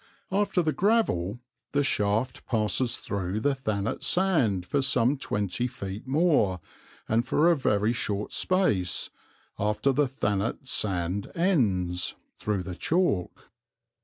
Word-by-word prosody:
After 195 -2 +1
the 155 -1 +1
gravel 125 - +1 0.3
the 145 0 +3
shaft 110 0 0
passes 115 +2 +1
through 100 0 -3
the 145 +4 +2
Thanet 110 -6 -2
sand 140 - +2
for 140 +8 0
some 130 0 +3
twenty 105 -3 -2
feet 100 0 -7
more 135 - +2 0.5
and 115 +2 +2
for 165 +3 +4
a - - +4
very 110 -5 +1
short 105 -3 -2
space, 110 - +1 0.5
after 105 +6 +1
the 140 +2 +2
Thanet 110 -1 -2
sand 95 -3 -1
ends, 100 - +1 0.2
through 105 -3 -1
the 90 - -6
chalk. 150 - -1
115 Hz, 125 wpm, -27 LUFS, 100-145 Hz, 0.5 s, for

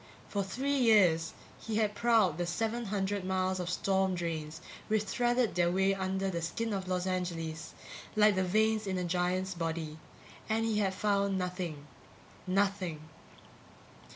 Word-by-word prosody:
For 200 -1 -1
three 265 +9 -1
years 185 -9 +4 0.3
he 220 - -4
had 215 -1 +1
prowled 215 -8 +3
the 175 - -1
seven 225 +6 -1
hundred 200 -1 -1
miles 185 0 0
of 180 -1 -3
storm 190 0 +1
drains 160 -3 -4 0.3
which 215 -1 +2
threaded 240 +3 +1
their 175 -1 +2
way 190 +2 +3
under 190 0 -1
the 170 -1 -2
skin 220 +7 -2
of 190 -2 -3
Los 180 -1 -1
Angeles 170 -3 -3 0.4
like 210 0 +6
the 190 -1 +1
veins 215 +3 +2
in 190 -1 -1
a 180 - -1
giant's 180 +2 0
body 160 -2 -4 0.5
and 225 +1 +1
he 220 -2 +1
had 190 -2 0
found 200 -1 +1
nothing. 180 -5 -4 0.6
_Nothing. 195 -3 +1
190 Hz, 155 wpm, -31 LUFS, 175-210 Hz, 0.6 s, like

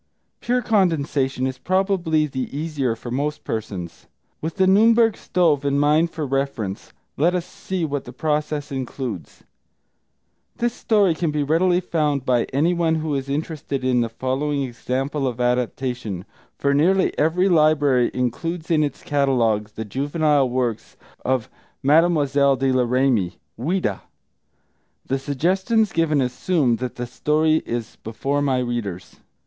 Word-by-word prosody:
Pure 245 +1 0
condensation 145 - +1
is 130 -1 -3
probably 185 -3 +1
the 130 -3 -4
easier 145 -6 -1
for 120 +1 -8
most 145 +4 -2
persons. 95 -6 -5 0.3
With 160 +1 -4
The 190 - +3
Nürnberg 225 +3 +5
Stove 160 -6 +1
in 140 0 +1
mind 150 +3 +3
for 160 -2 -4
reference, 135 -8 -3 0.3
let 170 +5 +2
us 175 -1 -1
see 180 -1 -4
what 145 -2 -3
the 125 - -8
process 150 +1 -2
includes. 130 -6 -5 1.1
This 240 0 0
story 205 -7 +2
can 165 0 -1
be 150 -1 0
readily 175 +5 +2
found 150 -6 -1
by 125 -3 +2
anyone 165 +3 +1
who 155 -1 -2
is 135 -1 -3
interested 145 -2 -3
in 125 -1 +2
the 115 - -1
following 135 +4 -1
example 135 +3 -2
of 125 -1 -4
adaptation, 125 -5 -1 0.3
for 140 0 +1
nearly 185 +7 +3
every 170 +5 +2
library 150 -7 +3
includes 160 +7 -3
in 155 -2 +4
its 145 - -4
catalogue 120 -7 +1
the 110 - -4
juvenile 145 +3 +1
works 120 -3 -2 0.3
of 130 -3 0 0.4
Mlle. 165 +5 +5 0.4
de 135 0 +1
la 130 -1 +2
Ramée 120 -7 +1 0.2
(Ouida). 140 - -1 1.0
The 135 +1 -1
suggestions 190 - +1
given 155 -3 +2
assume 125 0 +1
that 125 +1 -5
the 125 - -4
story 155 +5 +1
is 115 -2 -4
before 135 +6 -2
my 135 -3 +1
readers. 110 -8 -4
140 Hz, 140 wpm, -22 LUFS, 125-160 Hz, 1.1 s, Nürnberg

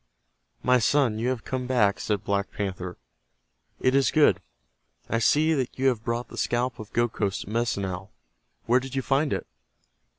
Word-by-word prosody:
"My 125 0 +4
son, 120 -2 +2
you 120 +3 0
have 130 -3 -2
come 130 -1 -3
back," 105 -6 +2
said 105 -2 -1
Black 100 -1 -1
Panther. 90 -3 -4 0.8
"It 130 - +2
is 135 0 +4
good. 145 - +4 0.7
I 115 - 0
see 155 +7 +3
that 130 -5 -2
you 135 +1 +3
have 115 -4 -2
brought 120 +2 -2
the - - -10
scalp 120 +1 0
of 110 +1 -9
Gokhos, 110 -4 -1
the 100 - -9
Medicine 115 -3 0
Owl. 95 +2 -6 0.5
Where 125 +2 +4
did 135 +1 -7
you 135 - 0
find 140 +3 +1
it!" - - -2
120 Hz, 175 wpm, -26 LUFS, 105-130 Hz, 0.8 s, My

